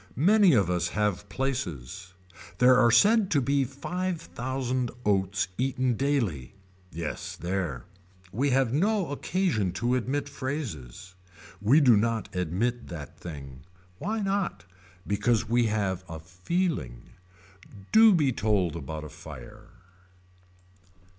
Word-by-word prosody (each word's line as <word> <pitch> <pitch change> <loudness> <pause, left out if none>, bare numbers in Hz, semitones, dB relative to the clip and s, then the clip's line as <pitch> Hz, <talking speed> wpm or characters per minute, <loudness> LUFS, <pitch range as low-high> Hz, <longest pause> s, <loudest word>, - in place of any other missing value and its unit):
Many 195 - +5
of 100 -7 +3
us 90 -1 0
have 105 -1 -1
places. 95 - -4 0.4
There 125 0 +6
are 120 -2 +5
said 205 - +5
to 145 - +3
be 140 +1 +1
five 175 +7 -3
thousand 130 -3 -3 0.2
oats 95 -2 +1
eaten 130 -1 +1
daily. 115 - -1 0.4
Yes 80 -1 -5
there. 85 -8 -3 0.5
We 135 +8 0
have 130 -2 +2
no 195 +1 +1
occasion 145 - 0
to 120 +6 0
admit 130 +3 -1
phrases. 120 - -6 0.5
We 130 +10 +5
do 125 -5 +6
not 110 -1 -1
admit 95 +8 -1
that 80 -5 -9
thing. 70 -6 -9 0.4
Why 215 +5 -2
not. 195 - -2 0.4
Because 110 +3 +1
we 120 +1 +2
have 100 -4 -1
a 80 -1 -6
feeling. 90 - -3 0.8
Do 220 0 +8
be 145 -5 +2
told 100 -7 0
about 80 0 -6
a 75 - -8
fire. 105 +7 -11
120 Hz, 120 wpm, -27 LUFS, 90-140 Hz, 0.8 s, Do